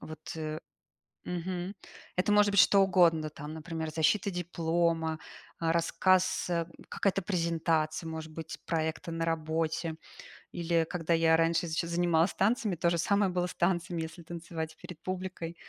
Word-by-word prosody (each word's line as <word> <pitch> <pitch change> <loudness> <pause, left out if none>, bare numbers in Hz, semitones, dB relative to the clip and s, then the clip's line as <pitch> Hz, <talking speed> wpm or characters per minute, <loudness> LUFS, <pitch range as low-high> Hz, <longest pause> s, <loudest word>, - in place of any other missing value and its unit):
Вот, 155 -1 -9 0.2
э. 155 -1 -4 0.6
Мгм. 180 +2 -3 0.4
Это 180 +3 +1
может 210 -1 +5
быть 200 - +6
что 200 - +6
угодно, 170 -5 +4
там 150 +1 -8
например, 160 0 -4
защита 165 +6 +2
диплома, 165 -2 0 0.4
рассказ, 170 +3 +2
э, 170 -2 0 0.2
какая-то 195 -1 0
презентация, 165 -3 0
может 160 0 -6
быть, 160 0 -6
проекта 160 0 -2
на 165 0 -2
работе. 160 0 -1 0.6
Или 170 -1 +1
когда 170 -1 0
я 165 0 +4
раньше 165 +1 +2
ещё 160 +1 -1
занималась 170 0 +2
танцами, 210 -1 +1
то 170 +1 +2
же 170 - +1
самое 200 +3 +2
было 180 0 0
с - - -8
танцами, 175 -1 0
если 160 +1 -7
танцевать 165 -1 -6
перед 165 -3 -10
публикой. 185 -2 -4
170 Hz, 145 wpm, -30 LUFS, 160-180 Hz, 0.6 s, быть